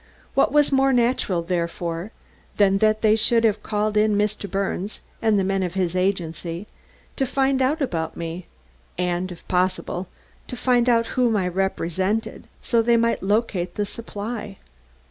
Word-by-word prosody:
What -, -, +3 dB
was 295 Hz, -1 st, +4 dB
more 270 Hz, 0 st, +4 dB
natural, 235 Hz, -8 st, +1 dB
therefore, 170 Hz, +1 st, -3 dB, 0.5 s
than 195 Hz, -1 st, +4 dB
that 215 Hz, +1 st, +2 dB
they 215 Hz, 0 st, +5 dB
should 230 Hz, +1 st, +3 dB
have 215 Hz, -2 st, +2 dB
called 210 Hz, 0 st, -1 dB
in 210 Hz, 0 st, +3 dB
Mr. 210 Hz, -1 st, -1 dB
Birnes, 195 Hz, +1 st, -3 dB, 0.2 s
and 220 Hz, -2 st, +3 dB
the 195 Hz, -, +2 dB
men 195 Hz, 0 st, 0 dB
of 180 Hz, -1 st, -3 dB
his 180 Hz, -2 st, 0 dB
agency, 175 Hz, -1 st, -2 dB, 0.5 s
to 270 Hz, -, 0 dB
find 270 Hz, +1 st, +1 dB
out 285 Hz, +4 st, +1 dB
about 165 Hz, -10 st, -3 dB
me, 170 Hz, +1 st, -5 dB, 0.5 s
and, 180 Hz, +1 st, -1 dB
if 175 Hz, -, -12 dB
possible, 185 Hz, 0 st, -1 dB, 0.4 s
to -, -, -6 dB
find 245 Hz, 0 st, +2 dB
out 230 Hz, -1 st, +3 dB
whom 240 Hz, -4 st, +2 dB
I 185 Hz, -2 st, 0 dB
represented, 190 Hz, +3 st, -1 dB, 0.2 s
so 235 Hz, -1 st, +2 dB
they 235 Hz, +1 st, +3 dB
might 230 Hz, 0 st, +1 dB
locate 190 Hz, -3 st, 0 dB
the 205 Hz, -, 0 dB
supply? 210 Hz, -1 st, -6 dB
205 Hz, 160 wpm, -23 LUFS, 180-230 Hz, 0.5 s, they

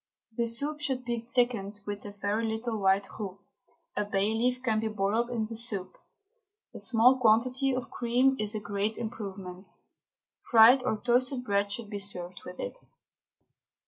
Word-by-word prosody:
The 235 Hz, 0 st, 0 dB
soup 285 Hz, +6 st, -2 dB
should 265 Hz, -4 st, -2 dB
be 235 Hz, -1 st, -1 dB
thickened 230 Hz, -4 st, -1 dB
with 205 Hz, 0 st, -5 dB
a -, -, -7 dB
very 205 Hz, +2 st, -2 dB
little 220 Hz, 0 st, -2 dB
white 195 Hz, 0 st, +3 dB
roux, 195 Hz, -3 st, -5 dB, 0.6 s
a 210 Hz, -, +1 dB
bay 205 Hz, +1 st, 0 dB
leaf 250 Hz, +3 st, 0 dB
can 220 Hz, -4 st, +1 dB
be 220 Hz, -, -1 dB
boiled 215 Hz, +3 st, 0 dB
in 230 Hz, -3 st, -1 dB
the 225 Hz, +1 st, -7 dB
soup; 220 Hz, -5 st, -1 dB, 0.8 s
a -, -, -7 dB
small 250 Hz, +2 st, +4 dB
quantity 255 Hz, +4 st, +3 dB
of 255 Hz, -, -5 dB
cream 250 Hz, +3 st, +2 dB
is 215 Hz, 0 st, -1 dB
a -, -, -1 dB
great 205 Hz, +1 st, -2 dB
improvement. 195 Hz, -4 st, -6 dB, 0.8 s
Fried 235 Hz, +3 st, +8 dB
or 250 Hz, -4 st, -1 dB
toasted 250 Hz, +2 st, +1 dB
bread 200 Hz, -3 st, 0 dB
should 215 Hz, 0 st, -4 dB
be 205 Hz, -, -3 dB
served 180 Hz, -3 st, -3 dB
with 180 Hz, -, -10 dB
it. 100 Hz, -, -4 dB
220 Hz, 165 wpm, -29 LUFS, 205-245 Hz, 0.8 s, Fried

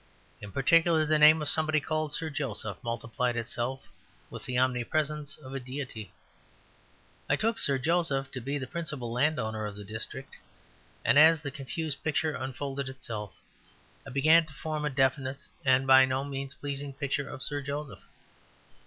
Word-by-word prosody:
In 105 Hz, -1 st, -8 dB
particular 165 Hz, -, +4 dB
the 155 Hz, 0 st, +2 dB
name 155 Hz, +1 st, +7 dB
of -, -, -1 dB
somebody 155 Hz, -1 st, +2 dB
called 155 Hz, 0 st, -2 dB
Sir 160 Hz, +1 st, -1 dB
Joseph 110 Hz, -9 st, -2 dB
multiplied 115 Hz, +1 st, -2 dB
itself 120 Hz, +2 st, -3 dB, 0.5 s
with -, -, -8 dB
the 125 Hz, -, -2 dB
omnipresence 145 Hz, +4 st, 0 dB
of 135 Hz, -3 st, -11 dB
a 135 Hz, -, -3 dB
deity. 125 Hz, -6 st, -6 dB, 1.2 s
I -, -, +4 dB
took 225 Hz, +1 st, 0 dB
Sir 140 Hz, -10 st, +3 dB
Joseph 145 Hz, -2 st, +1 dB
to 130 Hz, -, -5 dB
be 140 Hz, +4 st, -2 dB
the 135 Hz, -, -4 dB
principal 145 Hz, -5 st, -4 dB
landowner 115 Hz, -5 st, 0 dB
of 100 Hz, -, -8 dB
the 105 Hz, -, -8 dB
district; 110 Hz, +6 st, -7 dB, 0.7 s
and 140 Hz, -, +6 dB
as 160 Hz, 0 st, +7 dB
the 145 Hz, -3 st, -4 dB
confused 150 Hz, +2 st, -4 dB
picture 155 Hz, 0 st, 0 dB
unfolded 135 Hz, +1 st, -4 dB
itself, 110 Hz, -6 st, -6 dB, 0.6 s
I -, -, -10 dB
began 155 Hz, +5 st, +5 dB
to 155 Hz, -, -13 dB
form 155 Hz, 0 st, -3 dB
a -, -, +1 dB
definite 135 Hz, 0 st, 0 dB, 0.2 s
and 130 Hz, -1 st, +4 dB
by 130 Hz, 0 st, +8 dB
no 130 Hz, +1 st, -1 dB
means 135 Hz, -1 st, -5 dB
pleasing 140 Hz, 0 st, -5 dB
picture 140 Hz, 0 st, -2 dB
of 130 Hz, -, -8 dB
Sir 145 Hz, -1 st, -2 dB
Joseph. 140 Hz, +1 st, -5 dB
140 Hz, 160 wpm, -29 LUFS, 130-150 Hz, 1.2 s, by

